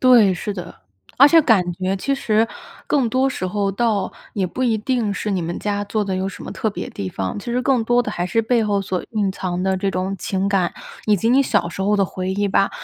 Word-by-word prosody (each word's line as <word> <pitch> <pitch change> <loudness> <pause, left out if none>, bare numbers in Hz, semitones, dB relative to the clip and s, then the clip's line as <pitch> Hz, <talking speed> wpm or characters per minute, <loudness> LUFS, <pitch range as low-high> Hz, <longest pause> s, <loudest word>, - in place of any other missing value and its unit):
对， 240 -6 +6
是 185 +3 -3
的， 180 -2 -9 0.3
而 275 - +9
且 325 +2 +6
感 225 -8 +5
觉 190 +2 -2
其 275 +8 -1
实 225 -4 +2 0.4
更 270 -5 +2
多 260 +4 +2
时 260 - -4
候， 200 +2 -1
倒 210 -2 0 0.2
也 195 -3 0
不 255 +9 -4
一 230 -3 +2
定 225 -2 0
是 210 - -3
你 190 -4 0
们 170 +1 -3
家 205 -1 -2
做 210 +1 -1
的 195 -1 -2
有 190 +1 -1
什 195 - -9
么 - - -6
特 220 - -1
别 - - -5
地 95 - -5
方， 95 0 -4
其 205 - -10
实 240 +1 0
更 255 -2 +2
多 240 +2 +3
的 240 - -2
还 175 -4 -2
是 190 +5 +1
背 230 +1 +2
后 205 -2 +1
所 190 -2 -3
蕴 205 -4 0
藏 180 -2 -3
的 190 0 +1
这 195 +1 -1
种 185 +1 -2
情 195 +1 -1
感， 190 -4 +1 0.3
以 210 -1 +4
及 225 +4 0
你 260 +3 +5
小 205 -9 +1
时 190 - -5
候 205 +2 +2
的 200 - +3
回 185 0 -4
忆 205 +1 0
吧。 195 0 +2
205 Hz, 270 characters per minute, -21 LUFS, 190-230 Hz, 0.4 s, 而